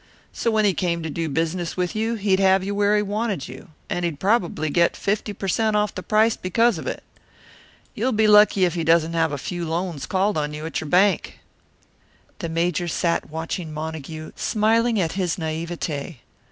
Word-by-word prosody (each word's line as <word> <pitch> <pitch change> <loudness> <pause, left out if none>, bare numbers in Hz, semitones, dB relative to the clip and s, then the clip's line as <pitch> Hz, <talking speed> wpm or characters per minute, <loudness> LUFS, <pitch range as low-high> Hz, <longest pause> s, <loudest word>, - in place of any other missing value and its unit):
So 235 - -1
when 220 -1 +2
he 200 - +3
came 170 -2 -1
to 160 - -4
do 165 +1 -2
business 165 +4 -2
with 180 +1 -1
you, 225 +2 0
he'd 195 -3 +1
have 190 -1 +4
you 200 +1 -2
where 205 +1 +2
he 210 - +1
wanted 205 - -2
you, 130 +8 -11 0.2
and 175 - -2
he'd 165 -4 -2
probably 185 -7 +1
get 170 +2 +2
fifty 210 +1 -1
per 200 -1 -6
cent 215 +3 +1
off 210 -1 +1
the 185 - -5
price 215 +4 +3
because 225 +1 +1
of - - -7
it. - - -4 0.9
You'll 245 +5 0
be 220 -1 +2
lucky 210 -2 +6
if 175 - 0
he 170 -2 -2
doesn't 165 0 +3
have 165 -2 +1
a 145 - -2
few 175 +5 -4
loans 165 -2 -3
called 190 -2 +1
on 150 0 -3
you 150 +1 -6
at 160 - -3
your 155 - -6
bank." 190 +4 +2 1.0
The 170 -4 -4
Major 175 +1 0
sat 170 +1 -1
watching 160 +1 -4
Montague, 155 0 -6
smiling 225 +1 +2
at 165 -3 0
his 185 -4 -1
naivete. 160 -3 -4
180 Hz, 195 wpm, -23 LUFS, 160-210 Hz, 1.0 s, lucky